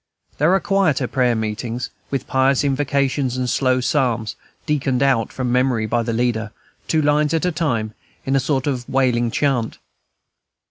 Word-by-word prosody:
Then - - -34
there 155 +6 +4
are - - +3
quieter 185 -11 +1
prayer 125 -2 +1
meetings, 115 +3 -3 0.2
with 135 -1 -2
pious 130 +1 +2
invocations 135 -2 0
and 125 -1 -1
slow 130 0 +1
psalms, 125 -4 0 0.3
"deaconed 135 -3 0
out" 130 -5 +2
from 125 -2 -2
memory 125 -3 +1
by 120 +2 0
the 115 0 -2
leader, 115 -2 -1 0.4
two 155 -1 +1
lines 150 +2 +2
at 165 - 0
a 180 - +1
time, 120 -10 -1 0.3
in 135 - +1
a - - +4
sort 135 0 -1
of 130 -4 -3
wailing 125 -3 +2
chant. 125 -3 0
130 Hz, 170 wpm, -20 LUFS, 120-140 Hz, 0.4 s, there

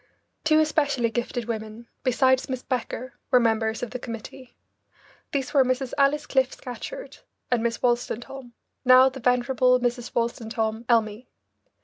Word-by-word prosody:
Two 310 0 +4
especially 290 -6 +1
gifted 240 0 -3
women, 220 0 -6 0.2
besides 260 +1 +2
Miss 255 -1 -3
Becker, 255 0 -4 0.2
were 250 - +5
members 225 -1 0
of 245 - -4
the 250 - -5
committee. 235 +2 -9 0.8
These 275 0 -2
were 275 -2 +6
Mrs. 255 0 -1
Alice 285 +1 +2
Cliff 265 -1 +1
Scatcherd - - -8 0.3
and 245 -2 +2
Miss 230 0 -1
Wolstentholm, 245 +1 -2 0.3
now 255 0 +7
the 265 +1 -9
venerable 250 +1 +3
Mrs. 245 0 -2
Wolstentholm 225 -1 -2
Elmy. 225 0 +1
250 Hz, 135 wpm, -25 LUFS, 235-265 Hz, 0.8 s, now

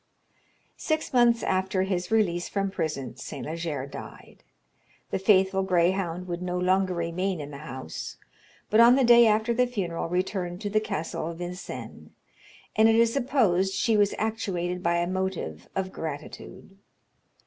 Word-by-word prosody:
Six 315 -3 -2
months 240 -2 +4
after 190 0 0
his 185 -2 -2
release 180 -6 +1
from 195 -1 -1
prison 145 - -3
St. 120 - -7
Leger 155 -4 -3
died. 140 - -11 0.7
The - - -1
faithful 190 -1 +3
greyhound 180 -1 0
would 175 0 -4
no 180 0 -2
longer 185 0 +1
remain 170 +2 -2
in 145 0 -7
the 140 - -8
house; 130 - -7 0.5
but 215 - +4
on 235 +2 +8
the 270 - +3
day 235 -1 +7
after 220 +2 +2
the 250 +2 +2
funeral 180 -9 -3
returned 180 0 -2
to 205 -2 -3
the 215 - +3
castle 195 -6 -3
of 165 0 -6
Vincennes, 180 +1 -7 0.7
and 220 +1 +5
it 225 - +4
is 230 0 +4
supposed 215 -9 +2
she 225 +3 +2
was 205 -1 +3
actuated 180 -5 -2
by 170 -1 +1
a 170 - +1
motive 185 - -3
of 190 -1 -2
gratitude. 160 +5 -8
185 Hz, 155 wpm, -27 LUFS, 170-215 Hz, 0.7 s, on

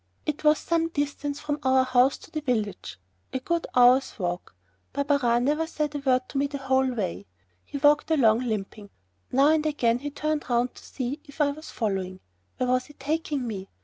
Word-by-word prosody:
It 300 0 -3
was 300 0 +5
some 330 -1 0
distance 290 -1 -3
from 295 -1 -3
our 260 -1 +4
house 255 +1 +3
to - - -16
the 310 - -3
village 215 - -2 0.3
a 260 - -2
good 340 +5 -1
hour's 250 +2 +5
walk. 175 - -4 0.4
Barberin 280 -4 +2
never 300 +3 +1
said 300 -2 -2
a 290 - -2
word 255 -2 +1
to 275 - -2
me 280 - +2
the 280 0 -5
whole 265 -1 +1
way. 100 - -3 0.4
He - - -6
walked 295 +2 +4
along, 235 -8 +4
limping. 215 -3 -4 0.4
Now 275 +3 +5
and 310 -1 +3
again 245 -6 +1
he 290 +3 -4
turned 305 0 -2
'round 245 +1 +1
to - - -15
see 260 +3 -4
if 285 0 -15
I 290 -1 +3
was 310 +2 -10
following. 190 -4 -2 0.4
Where 255 - 0
was 255 0 +2
he 295 - -14
taking 295 -1 -2
me? 195 -4 -5
270 Hz, 195 wpm, -26 LUFS, 240-295 Hz, 0.4 s, was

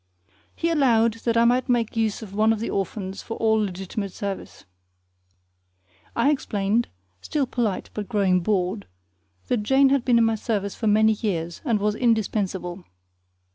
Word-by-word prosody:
He 335 0 0
allowed 230 -7 +3
that 230 -1 +2
I 230 - +5
might 250 +2 +2
make 235 -3 +1
use 220 -1 -1
of 200 -3 -10
one 215 +2 +3
of 225 - 0
the 230 - -3
orphans 195 0 -3
for 225 - -6
all 220 -1 +2
legitimate 195 +1 -4
service. 200 +1 -6 1.5
I 235 +5 +3
explained 220 -4 0 0.3
still 295 -3 -1
polite, 235 -6 -2
but 210 -2 -5
growing 195 -5 +2
bored 190 +2 -1 0.6
that 245 -4 0
Jane 270 +5 +4
had 275 -2 +2
been 245 -2 +3
in 230 - +4
my 225 - +2
service 210 -3 -2
for 225 - -3
many 215 +1 +4
years, 175 -6 -3
and 225 -4 +1
was 210 +1 +1
indispensable. 200 -6 -1
220 Hz, 160 wpm, -24 LUFS, 200-235 Hz, 1.5 s, I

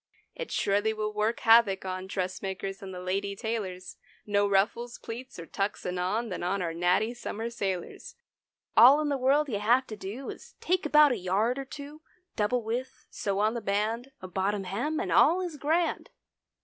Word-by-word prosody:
130 - - -5
It - - -11
surely 205 +2 +1
will 215 0 -3
work 215 +2 0
havoc 225 -5 +5
on 185 0 -4
Dressmakers 190 +1 -4
and 195 -1 -7
the 180 - -7
lady 200 +2 -2
tailors; 195 -4 -4 0.3
No 205 -1 +2
ruffles, 230 +5 +1
pleats 245 +3 -8
or 170 - -7
tucks 200 +4 -3
anon, 185 +6 -1
Than 185 - -4
on 185 +3 0
our 165 -1 -2
natty 180 +7 +1
summer 230 -1 -5
sailors. 190 -6 -4 0.6
All 265 +5 +8
in 300 - -1
the 285 - +1
world 280 +4 +3
you 215 -7 -2
have 240 +5 +3
to 215 - -7
do 210 +7 -6
Is - - -13
take 365 -2 0
about 300 -1 +6
a 245 - 0
yard 205 +7 0
or 275 - -5
two, 290 +3 -10 0.3
(Double 230 +3 0
width), 240 +4 -4
sew 200 -1 -2
on 215 +2 +2
the 235 - -4
band— 215 +5 -1
A 185 - -7
bottom 195 +2 -1
hem, 235 +12 -2
and - - -2
all 335 +5 +5
is 350 -5 -4
grand. 325 +4 0
215 Hz, 190 wpm, -28 LUFS, 195-250 Hz, 0.6 s, All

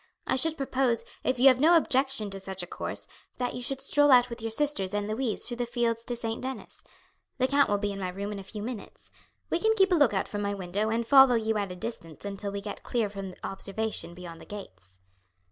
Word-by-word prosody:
I - - +1
should 320 +4 +1
propose, 260 -3 +1 0.2
if 255 - +1
you 255 +3 +6
have 255 -1 +3
no 330 +4 +6
objection 265 -8 +1
to 195 - -4
such 190 -1 -5
a - - -4
course, - - -4 0.3
that 250 -1 -2
you 245 - -5
should 270 +2 -2
stroll 290 +1 +4
out 250 -2 +6
with 235 - -6
your 225 - -2
sisters 220 -6 +1
and 205 0 -1
Louise 220 +1 -1
through 240 - -3
the 240 -1 -2
fields 235 -1 0
to 245 - -2
St. 225 -1 -4
Denis. 260 0 -7 0.5
The 255 -1 +2
count 285 +1 +3
will 205 - +2
be 205 0 -2
in 200 - -6
my 185 -1 -2
room 200 +3 -5
in 205 - -5
a - - -8
few 205 +2 -7
minutes. 225 -3 -8 0.4
We 335 - +2
can 440 +4 +3
keep 385 -2 +4
a - - +5
look 290 -7 +5
out 190 - 0
from 205 - -4
my 200 0 -1
window 195 +3 -2
and 230 +1 0
follow 265 0 +7
you 220 -1 0
at 200 -2 -3
a - - -6
distance 180 -4 -7
until 200 0 -4
we 200 0 -4
get 205 0 -7
clear 225 -4 -1
from 195 -2 -7
observation 195 -2 -3
beyond 175 -2 -9
the - - -11
gates." 95 - -11
225 Hz, 245 wpm, -28 LUFS, 200-255 Hz, 0.5 s, follow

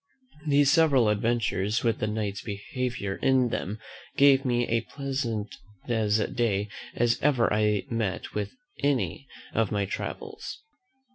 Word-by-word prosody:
These 140 -1 +5
several 145 -8 +5
adventures, 105 -1 0
with 115 -2 +1
the 110 - 0
Knight's 105 -2 -2
behaviour 105 -1 -3
in 130 -2 +3
them, 105 -1 -3 0.4
gave 140 -1 +6
me 120 -1 +2
as 115 0 0
pleasant 130 -7 -3 0.3
a 110 -3 +1 0.2
day 105 -5 0 0.3
as 120 0 +2
ever 130 -7 +3
I 105 -1 +2
met 110 -5 -2
with 105 -1 -2 0.3
in 145 +1 +3
any 135 +2 -4 0.3
of 115 -3 +1
my 100 -2 +1
travels. 435 - -5
115 Hz, 135 wpm, -27 LUFS, 105-135 Hz, 0.4 s, gave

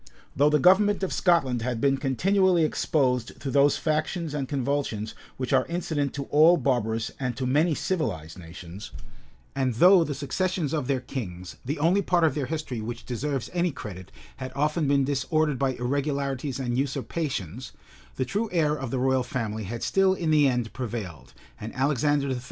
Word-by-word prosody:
Though 145 +2 +4
the 150 - +4
government 195 +6 +4
of 190 - -1
Scotland 135 -10 +2
had 120 -1 -2
been 135 +2 +2
continually 180 +6 +2
exposed 130 -6 0
to 135 - -4
those 140 +1 +4
factions 155 +1 -1
and 140 -3 -3
convulsions 135 -6 -2 0.2
which 130 -1 -2
are - - +3
incident 160 -5 -2
to 140 - -3
all 160 +4 +6
barbarous 115 -5 0
and 125 -3 -2
to 130 - -2
many 150 +5 +2
civilized 95 - -3
nations; 85 +4 -9 0.7
and 130 -3 0
though 180 - +7
the 150 -3 -3
successions 165 +2 -2
of 150 -5 -1
their 135 -3 0
kings, 90 -9 -6
the 145 +6 -3
only 170 +7 +3
part 175 -3 +2
of 155 -4 +4
their 140 -2 -2
history 145 -6 -4
which 115 +2 -6
deserves 135 +1 -3
any 175 0 +1
credit 95 - -8 0.3
had 130 -1 -6
often 150 +2 +1
been 140 0 +3
disordered 145 +1 0
by 135 -1 +1
irregularities 140 +1 -2
and 125 -1 -1
usurpations; 135 - -3 0.4
the 130 - -1
true 210 - -2
heir 155 -4 +2
of 135 -4 -5
the 130 - -2
royal 130 0 +2
family 110 -4 -3
had 115 +4 -5
still 190 -1 +3
in 165 -4 -1
the 150 -2 +5
end 120 -4 -1
prevailed, 110 - -6 0.3
and 110 +2 -7
Alexander 140 +1 +1
III. 130 -2 -1
140 Hz, 175 wpm, -26 LUFS, 125-155 Hz, 0.7 s, though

